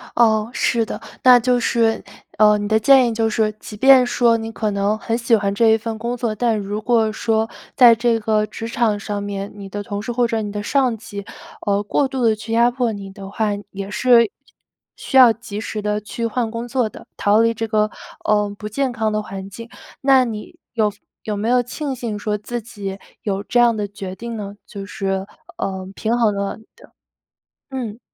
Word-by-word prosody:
哦， 220 -2 +3
是 235 -3 +1
的。 - - -6 0.2
那 250 -1 +8
就 245 +1 +2
是， 230 -1 +1 0.3
嗯， 210 0 +5
你 - - -2
的 220 +1 +3
建 260 +2 +6
议 230 - -1
就 225 0 +1
是， 215 0 +1
即 210 - -9
便 265 +2 +7
说 240 -1 +3
你 225 0 -5
可 215 -1 -2
能 200 +1 0
很 225 +1 -2
喜 235 -1 +3
欢 200 -2 0
这 225 +2 +4
一 220 - +5
份 225 0 -5
工 235 +2 -3
作， 235 -2 -1
但 230 -1 +1
如 205 +1 -4
果 225 -1 +2
说 220 0 0 0.3
在 240 -2 +8
这 230 0 +1
个 215 -1 +1
职 225 +2 -7
场 230 -3 0
上 205 0 -4
面， 200 0 -4
你 200 -1 -9
的 205 +1 -4
同 205 -2 -4
事 220 - -4
或 240 0 +1
者 225 -1 -1
你 205 -1 -4
的 205 0 -4
上 255 0 +1
级， 205 -2 -8 0.4
呃， 200 0 +2
过 270 +7 +1
度 265 -2 -3
地 220 -1 +4
去 220 +1 -8
压 235 +1 +5
迫 245 -2 0
你 200 -2 -7
的 195 0 -9
话， 215 +1 -1 0.2
也 195 0 -6
是 235 +2 +5
需 220 - -4 0.6
需 265 - -1
要 250 -3 +9
及 210 -2 -7
时 215 -1 -4
地 210 0 -1
去 230 +2 -4
换 230 0 -1
工 230 +1 -5
作 245 -2 0
的， - - -13
逃 205 +2 +4
离 230 0 +3
这 225 0 -3
个， 215 0 +1 0.4
呃， 210 -1 +2
不 210 - -6
健 265 +4 -1
康 220 -2 -1
的 215 0 0
环 195 -1 -7
境。 230 +4 -10 0.3
那 265 -1 +5
你 215 -3 -7 0.2
有 215 -3 +2 0.3
有 210 -1 -3
没 210 +2 -2
有 250 0 +4
庆 270 +3 -4
幸 230 -4 -4
说 210 0 -1
自 240 +3 -5
己 200 -3 -7 0.2
有 200 -1 -2
这 240 - +1
样 240 -1 +5
的 205 -1 -2
决 195 -2 -7
定 235 +2 -6
呢？ 200 -1 -6
就 200 -1 -8
是， 195 -2 -2 0.3
呃， 190 -1 -3
平 230 +2 0
衡 225 -3 +3
了 200 0 -3
你 220 - -18
的 475 - -18 0.8
嗯。 240 -5 -5
220 Hz, 230 characters per minute, -20 LUFS, 205-235 Hz, 0.8 s, 要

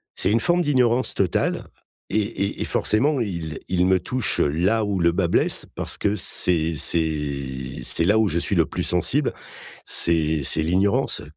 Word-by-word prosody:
c'est 95 - +2
une 115 - +3
forme 175 +8 +1
d'ignorance 130 -4 +1
totale 95 -3 -1 0.4
et 110 - +1
et 100 -1 -3
et - - 0
forcément 135 +6 +1
il 85 -7 -4
il 90 -1 +1
me 95 0 +3
touche 125 +5 -1
là 95 +9 +1
où 100 -2 -2
le 85 0 +3
bât 85 0 0
blesse - - +1
parce - - -3
que 105 0 0
c'est 85 -5 +1
c'est 70 -5 -2
c'est 85 +7 +1
là 100 +5 +3
où 110 -2 +2
je 85 - -1
suis 100 - -1
le 85 -3 +3
plus - - -4
sensible, - - 0 0.5
c'est 80 -2 +1
c'est 80 - +3
l'ignorance. 95 +5 +1
90 Hz, 175 wpm, -22 LUFS, 80-105 Hz, 0.5 s, une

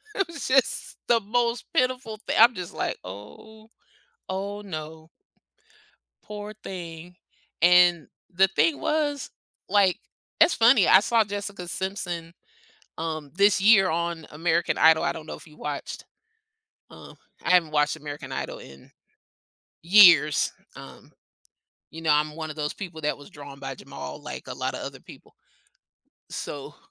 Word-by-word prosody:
It 390 -3 0
was 335 - -7
just 265 -1 +1
the 235 -1 +4
most 235 +3 -1
pitiful 255 -3 -1
thing - - -2
I'm 235 +1 +7
just, 180 -2 -7
like, - - -3
"Oh, 215 - -12 0.6
oh 200 +2 -4
no." 160 -4 -8 1.1
Poor 210 0 -8
thing, 175 -1 -8 0.5
and 175 -2 +5 0.3
the 190 +2 +4
thing 325 -3 +2
was, 295 -2 -1 0.4
like, 195 -3 +3 0.4
it's 330 +2 +6
funny, 230 -4 +5
I 190 - +7
saw 225 +1 +2
Jessica 200 -2 -6
Simpson, 175 -3 -4 0.7
um, 155 -3 -4
this 200 0 +4
year 200 -3 +6
on 170 0 -2
American 165 +2 0
Idol. 160 0 +5
I - - 0
don't 155 - -9
know - - -6
if - - -15
you 150 - -18
watched. 145 -1 -6 0.9
Uh, - - -13 0.3
I - - 0
haven't 170 -4 +4
watched 150 0 +1
American 145 -2 -8
Idol - - -5
in, 70 0 -14 0.9
years, 170 -6 +6 0.2
um. - - -13 0.8
You 165 - -10
know, 160 - -2
I'm 150 +1 +1
one 160 -1 -5
of 150 - -7
those 150 -1 -3
people 175 -5 -8
that 150 0 -1
was 145 - -13
drawn 140 -2 -12
by - - -6
Jamal, 70 0 -9
like, - - -8
a - - -5
lotta - - -3
other - - -7
people. - - -16 1.0
So, - - -7
175 Hz, 145 wpm, -25 LUFS, 155-210 Hz, 1.1 s, I'm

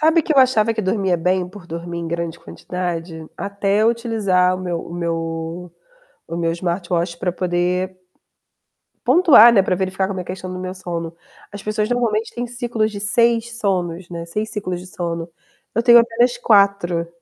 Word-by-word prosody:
Sabe 320 +1 +4
que 310 - 0
eu 280 - +3
achava 230 -4 +4
que 220 - -2
dormia 190 -2 0
bem 180 +2 0
por 190 -1 -13
dormir 170 +1 -6
em 170 - -4
grande 170 0 -3
quantidade? 165 -2 -5
Até 200 +1 0
eu 225 - +5
utilizar 200 -6 +1
o - - -7
meu 175 -2 -3
o 170 - -9
meu 170 -1 -1 1.1
o 165 - -4
meu 165 -1 0
smartwatch 170 0 -2
pra 180 -2 -1
poder 180 +1 -1 1.1
pontuar, 275 - +7
né, 195 - +6
pra 185 -1 0
verificar 190 +1 -1
como 195 -2 -4
é 180 - -4
a - - -20
questão 185 0 -6
do 185 - -6
meu 185 0 -5
sono. 170 -3 -5 0.4
As 205 -1 -9
pessoas 215 0 -1
normalmente 230 -3 0
têm 240 0 -4
ciclos 235 -3 -2
de 205 - -6
6 235 +2 +1
sonos, 180 -3 -2
né, 170 -1 -6
6 210 +6 -3
ciclos 185 -4 -4
de 180 - -11
sono. 170 -2 -4 0.4
Eu 230 - +1
tenho 240 -1 +8
apenas 240 +1 +2
4, 200 -7 +3
185 Hz, 180 wpm, -20 LUFS, 175-220 Hz, 1.1 s, tenho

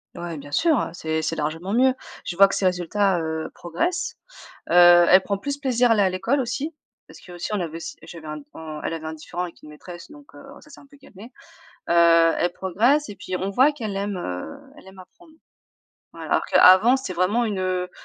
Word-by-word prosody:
Ouais, 170 -2 -6
bien 145 0 -11
sûr, 320 - +2
heu, - - -2
c'est 160 -2 -3
c'est 160 - -3
largement 160 +5 -4
mieux. 255 +2 +3 0.3
Je 175 - -5
vois 195 +2 +6
que - - -3
ses 195 - -1
résultats, 185 +1 +1
heu, 160 0 -4
progressent, 340 - -3 0.5
heu, 175 0 +7
elle 185 - +7
prend 200 +1 -3
plus 280 +8 -5
plaisir 250 -3 +1
à - - +5
aller 210 - +2
à 190 - +2
l'école 195 +10 -1
aussi 270 +6 -3 0.4
parce - - -14
qu'aussi 175 +2 -8
on 210 - 0
avait 165 -3 -5 0.3
j'avais 160 -1 -11
un 150 0 -6
on 155 -1 -8
elle - - -2
avait 160 -1 -7
un 160 - -5
différend 165 +3 -6
avec 175 -2 -8
une 150 - -12
maîtresse, 175 - -12
donc 290 -1 -17
heu, - - -13 0.2
ça 305 - -19
s'est - - -14
un 280 - -17
peu 285 - -20
calmé, 230 -3 -15 0.6
heu, 170 -1 +5
elle 175 - 0
progresse 235 - +1
et 205 - -9
puis 185 0 -7
on 190 - -3
voit 260 +9 +3
qu'elle 220 -9 -6
aime, 200 -1 -3
heu, 90 - -6 0.2
elle 300 - -17
aime 190 0 -16
apprendre. 315 - -17 0.8
Ouais, - - -10
alors - - 0
qu'avant 200 +8 +6
c'était 265 -8 -6
vraiment 185 +7 +1
une, 210 -4 -3
heu 185 -1 -2
185 Hz, 220 wpm, -23 LUFS, 170-240 Hz, 0.8 s, heu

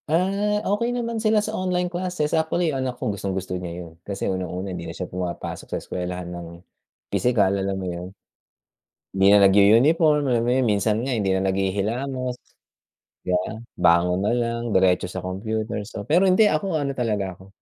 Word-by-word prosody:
Ah, 195 +5 +1
okey 235 +5 0
naman 230 -2 -2
sila 215 -1 +2
sa 215 - -4
online 180 -3 0
classes, 180 -3 -2
actually 160 0 +1
yung 135 - -2
anak 130 -1 -3
ko 105 - -2
gustong-gusto 95 -2 -4
niya 85 0 -6
yun. 80 - -13
Kasi 100 +1 -5
unang-una, 95 0 -3
hindi 85 -2 -6
na 85 - -8
siya 90 - -3
pumapasok 90 -1 -5
sa - - -2
eskuwelahan 90 0 -5
ng 85 -1 -7 0.7
pisikal, 110 -6 +2
alam 95 0 -1
mo 95 - -4
yun. 90 0 -4 1.1
Hindi 95 0 +3
na 105 - +7
nag-u-uniform, 140 - +5
alam 120 -3 +2
mo 120 - 0
yun. 130 0 +2
Minsan 105 +2 +1
nga 135 - 0
hindi 100 -4 0
na 95 0 +1
naghihilamos, 110 +7 -1 0.9
di 90 - -1
ba? 90 +4 -1 0.2
Bangon 90 +1 +4
na - - +2
lang, 115 -1 -1
diretso 90 -1 +3
sa 95 0 -6
computer. 110 +4 -3
So, 105 - -7
pero 175 - +3
hindi 185 +4 +5
ako 190 -5 0
ano 140 -2 -1
talaga 105 -7 -1
ako, 95 - -14
110 Hz, 180 wpm, -23 LUFS, 95-155 Hz, 1.1 s, na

